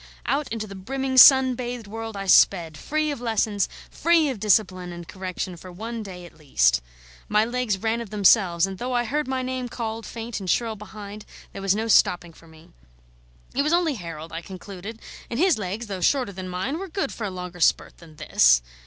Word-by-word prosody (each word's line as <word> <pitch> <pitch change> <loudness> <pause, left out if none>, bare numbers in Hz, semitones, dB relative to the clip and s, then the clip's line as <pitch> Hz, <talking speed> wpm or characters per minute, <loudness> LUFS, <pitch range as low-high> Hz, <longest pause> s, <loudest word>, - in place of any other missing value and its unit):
Out 285 0 0
into 225 -1 -3
the 200 - -10
brimming 260 +7 -3
sun 260 0 +9
bathed 245 -2 -5
world 225 0 -6
I 195 - -4
sped, 170 -4 +4
free 305 - -1
of 280 - -6
lessons, 220 -3 0 0.2
free 335 -3 +3
of 255 -6 -4
discipline 185 -3 +1
and 175 -1 -9
correction, 185 -1 -5
for 185 +2 -11
one 225 +5 -6
day 180 -4 -9
at 175 - -15
least. - - +2 0.5
My 210 +1 +3
legs 240 -4 -1
ran 225 +3 -1
of 230 - -8
themselves, 195 -4 +4
and 195 -1 -7
though 250 +1 -3
I 240 -1 +2
heard 295 +5 -2
my 260 -1 -2
name 255 -1 -3
called 225 -2 -5
faint 230 -1 -6
and 190 -2 -6
shrill 230 +1 +1
behind, 210 0 -10 0.3
there - - -7
was 195 0 +2
no 220 +2 -2
stopping 175 -5 +3
for 165 - -18
me. 160 0 -17 0.8
It 275 - +1
was 300 +3 +1
only 340 -3 +2
Harold, 165 - -8
I 165 - -4
concluded, 195 +4 -9 0.3
and 230 - -4
his 350 -4 +3
legs, 205 +4 -4
though 195 -4 -6
shorter 255 +2 +2
than 185 -1 -7
mine, 190 - -3
were 390 - -5
good 390 +4 -2
for 225 - -5
a - - -2
longer 180 -1 -7
spurt 160 - +1
than 165 -2 -15
this. - - +4
210 Hz, 205 wpm, -24 LUFS, 185-245 Hz, 0.8 s, sun